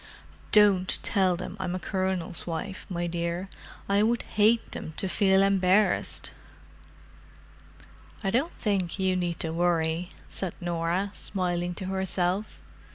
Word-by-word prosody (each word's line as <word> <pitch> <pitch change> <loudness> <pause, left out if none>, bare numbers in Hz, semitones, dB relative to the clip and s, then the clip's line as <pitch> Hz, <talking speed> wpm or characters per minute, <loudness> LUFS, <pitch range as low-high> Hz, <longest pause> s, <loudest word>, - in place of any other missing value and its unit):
Don't 200 -3 +5
tell 190 -4 +2
them 180 - -6
I'm 185 -1 -2
a - - -2
Colonel's 185 -2 -2
wife, 175 +4 -5
my 175 -2 -2
dear; 170 +2 -2 0.4
I 200 +1 +3
would 230 +2 +2
hate 220 +2 +2
them 160 - -6
to 190 - -1
feel 190 +1 +4
embarrassed!" 195 +1 +2 1.9
"I 195 - +1
don't 275 - +1
think 195 -6 -1
you 190 -1 +1
need 175 -2 -1
worry," 165 +1 0 0.2
said 190 -3 -3
Norah, 175 +3 -1
smiling 175 -2 -2
to 190 - -4
herself. 190 +1 0
185 Hz, 125 wpm, -27 LUFS, 175-195 Hz, 1.9 s, Don't